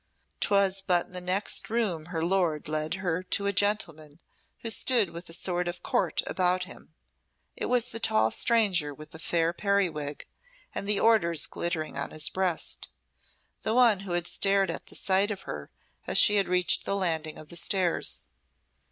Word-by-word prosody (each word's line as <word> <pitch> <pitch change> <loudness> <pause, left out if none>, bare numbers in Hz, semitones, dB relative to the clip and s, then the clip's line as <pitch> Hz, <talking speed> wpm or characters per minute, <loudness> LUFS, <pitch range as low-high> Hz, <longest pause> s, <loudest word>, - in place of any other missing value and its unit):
'Twas 195 -1 +2
but 180 -2 +1
in - - -23
the 180 - -3
next 185 +3 -1
room 210 -9 -1
her 165 -2 -3
lord 175 -5 0
led 155 +2 -2
her 180 -2 -2
to 200 +2 -1
a 200 - 0
gentleman 165 -7 -1 0.4
who 230 - -3
stood 225 -5 +2
with 170 +1 -9
a - - -8
sort 175 0 0
of 175 0 -5
court - - 0
about 185 -1 0
him. 165 -2 -13 0.6
It - - -4
was 250 -2 +1
the 225 - -3
tall 110 - +2
stranger, 185 -11 +2
with 155 +1 -12
the 160 - -10
fair 165 0 0
periwig, 175 -8 -1 0.5
and 200 - -3
the 210 - +3
orders 170 -9 +4
glittering 160 -4 -4
on 140 - -3
his 155 0 0
breast 185 -3 -1 0.7
the 220 +1 -1
one 235 -6 +5
who 195 -2 -6
had 175 0 -1
started 195 +1 +2
at - - -9
sight 195 +2 +1
of 200 -3 -5
her 75 -1 -7 0.4
as - - +2
she 210 - +7
had 200 - +2
reached 180 0 +3
the 195 - -1
landing 160 -5 -1
of 155 - -12
the - - -8
stairs. 170 - +1
180 Hz, 180 wpm, -27 LUFS, 160-200 Hz, 0.7 s, she